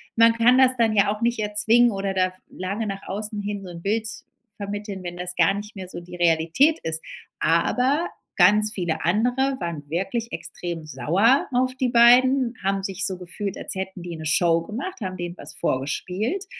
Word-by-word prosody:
man 230 0 +6
kann 235 +2 +4
das 260 -1 +6
dann 225 -2 +2
ja 205 0 +3
auch 210 - -13
nicht 235 0 +1
erzwingen 220 +3 +3
oder 195 -1 -2
da 185 -1 +1 0.2
lange 200 +4 -4
nach 195 -1 -5
außen 210 +2 -4
hin 205 0 -4
so 185 - -9
'n 170 -1 -9
Bild 220 +2 0 0.5
vermitteln, 205 -1 -6
wenn 175 0 -6
das 180 0 -5
gar 175 +2 +4
nicht 205 +2 -7
mehr 190 -2 -7
so 175 - -7
die 175 +1 -11
Realität 175 - +3
ist. 160 0 -2 0.4
Aber 255 - +1 0.3
ganz 210 +1 +4
viele 175 -4 -2
andere 245 +9 +1
waren 165 -5 -5
wirklich 195 +8 -2
extrem 170 -3 -6
sauer 175 - +2
auf 255 +1 +1
die 255 -1 0
beiden, 245 +1 +5
haben 195 0 0
sich 190 -1 -1
so 190 0 -2
gefühlt, 185 +2 -5
als - - -5
hätten 190 -1 -5
die 175 -1 -6
'ne 160 0 -8
Show 165 +1 +3
gemacht, 250 - -6
haben 185 -2 -4
denen 175 0 -6
was 145 0 -7
vorgespielt 180 - -2
200 Hz, 190 wpm, -23 LUFS, 175-230 Hz, 0.5 s, man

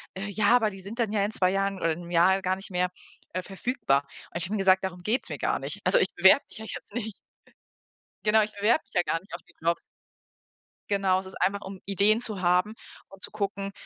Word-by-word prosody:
„Äh, 190 +2 -4
ja, 215 +4 +4
aber 220 -3 +3
die 195 - -10
sind 205 +5 -8
dann 225 -3 +1
ja 205 -2 +1
in 210 - -3
2 185 -3 +2
Jahren 195 0 0
oder 165 -2 0
in 160 - -4
'nem 170 0 -10
Jahr 185 +3 +4
gar 185 0 0
nicht 195 +1 -11
mehr, 180 0 +1 0.4
äh, 185 - -2
verfügbar.“ 190 - 0 0.3
Und - - -4
ich 175 - 0
habe 210 +4 -3
ihm - - 0
gesagt: 190 0 +4
„Darum 180 -2 -4
geht's 225 +6 0
mir - - -4
gar - - 0
nicht.“ - - -6
Also, - - +4
ich - - +3
bewerbe - - +7
mich - - -11
ja 220 - -7
jetzt 210 - -9
nicht. 220 -2 -3 1.1
Genau, 215 +1 +5
ich 210 - -4
bewerbe 215 +9 +2
mich - - -27
ja - - +3
gar 165 - -1
nicht 195 - -18
auf - - -5
die - - -25
Jobs. 170 +1 +1 1.1
Genau, 195 -2 +2
es 190 - -8
ist 190 - -10
einfach, 200 +2 +1
um 190 -1 -8
Ideen 200 +3 +3
zu 215 -6 -1
haben 180 +4 +2 0.4
und 195 0 -13
zu - - -6
gucken: 200 -1 -3
195 Hz, 245 wpm, -27 LUFS, 185-210 Hz, 1.1 s, bewerbe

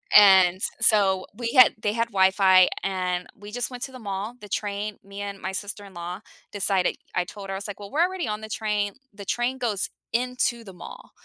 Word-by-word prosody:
And 190 -2 +7 0.2
so 190 -3 +4
we 235 0 -3
had 255 -3 +8
they 210 0 0
had 230 0 0
Wi-Fi, 190 -1 +5 0.2
and 180 -2 -2
we 205 +1 -10
just 245 +2 -3
went 245 -1 -8
to 265 - -6
the 255 - -9
mall. 205 +2 -4
The 210 - -11
train 205 0 -3
Me 200 +1 -8
and 200 -1 -5
my 190 - -4
sister-in-law 195 -3 -6 0.3
decided 195 -2 0 0.2
I - - +2
told 195 +2 -9
her, 195 - -4
I - - -2
was 200 - -7
like, 205 - -7
"Well, 200 - -9
we're 305 - +1
already 365 -5 -1
on 210 0 -3
the 220 - -8
train." 210 -2 -1 0.2
The 200 0 -9
train 245 +5 -1
goes 220 -6 -1 0.2
into 245 -1 0
the 190 - -10
mall. - - -11
205 Hz, 210 wpm, -25 LUFS, 190-230 Hz, 0.3 s, had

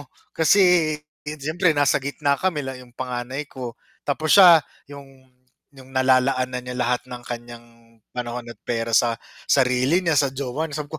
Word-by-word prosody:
ako?" 135 - -22 0.2
Kasi, 175 -2 +4 0.3
di 150 - -6
yun 155 - -7
siyempre 160 +5 +1
nasa 145 -2 +3
gitna, 140 +1 0
kami 175 -6 -1
la 135 - -5
'yong 125 -1 -14
panganay 130 +3 -4
ko. 125 -4 -8 0.3
Tapos 155 +2 +1
siya, 180 -4 +9 0.3
'yong 135 -2 -14 0.5
'yong 130 0 -14
nalalaan 130 0 +2
na 125 - -3
niya 125 0 -7
lahat 125 0 -1
ng 125 -1 -9
kanyang 120 -1 -8 0.5
panahon 120 -1 -5
at - - -9
pera 115 -1 -2
sa 115 0 +3 0.3
sarili 130 +4 +3
niya, 165 -3 +1
sa 140 -2 +2
jowa 140 +3 -3
niya. 150 -1 -5
Sabi 150 +2 -9
130 Hz, 175 wpm, -22 LUFS, 125-150 Hz, 0.5 s, siya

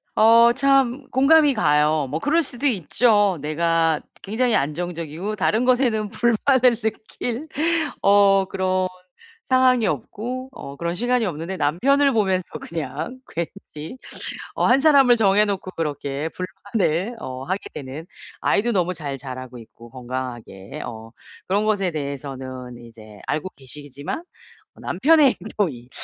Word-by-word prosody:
어 230 +2 +6
참 275 -1 +2
공감이 290 +2 +5
가요. 150 - +2
뭐 155 +4 -2
그럴 325 - +2
수도 260 +2 -1
있죠. 205 - +2
내가 165 +1 +1 0.2
굉장히 230 +4 0
안정적이고 170 +5 -3
다른 220 +3 +1
것에는 245 -5 +2
불만을 240 +3 +3
느낄 225 +5 -4 0.6
어 200 -1 +5
그런 185 -1 0 0.6
상황이 255 -3 +3
없고 245 - -4
어 140 - -9
그런 170 +3 -3
시간이 245 +3 +1
없는데 175 +2 -4
남편을 275 - +3
보면서 190 -5 +1
그냥 160 - -5
그 170 - -3 0.3
왠지 155 +13 -7 0.6
어 - - +1
1 260 +3 +5
사람을 275 -5 +6
정해 210 -2 +4
놓고 195 -2 -3
그렇게 145 -1 -3
불만을 190 +2 -2
어 130 -5 -6
하게 190 +6 -2
되는 140 +4 -7 0.4
아이도 235 +4 +2
너무 180 -1 +1
잘 145 -5 -5
자라고 130 -2 -8
있고 115 +1 -15
건강하게 125 -6 -7
어 115 -1 -9 0.4
그런 200 +3 +1
것에 195 -4 +1
대해서는 130 -4 -6
이제 110 -2 -14
알고 155 +5 -2
계시지만 145 - -7 0.6
남편의 280 - +4
행동이 160 - -3
185 Hz, 275 characters per minute, -22 LUFS, 145-235 Hz, 0.6 s, 어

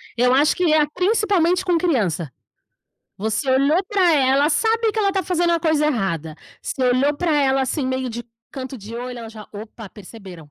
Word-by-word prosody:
Eu 250 +1 +3
acho 290 +3 +3
que 350 -3 +1
é 310 - +4
a 295 - +1
principalmente 370 -1 +1
com 350 -2 +2
criança. 195 - -1 0.9
Você 220 +6 -1
olhou 280 +7 +3
para 375 -5 +3
ela 275 +1 +3
sabe 445 +7 +1
que - - -4
ela 400 -2 +2
tá 385 -1 -1
fazendo 345 0 0
a 335 - +1
coisa 315 -2 +1
errada. 170 - -2 0.3
Você 265 - -4
olhou 255 +4 +2
para 340 +1 0
ela 270 0 +2
assim 265 +1 -2
meio 260 0 -2
de 240 +1 -6 0.3
canto 265 0 -7
de 215 +3 -10
olho 245 +1 -6
ela 230 -1 -8
já: 215 -2 -11
"Opa 215 0 -10
perceberam, 185 -7 -13
270 Hz, 195 wpm, -21 LUFS, 230-340 Hz, 0.9 s, é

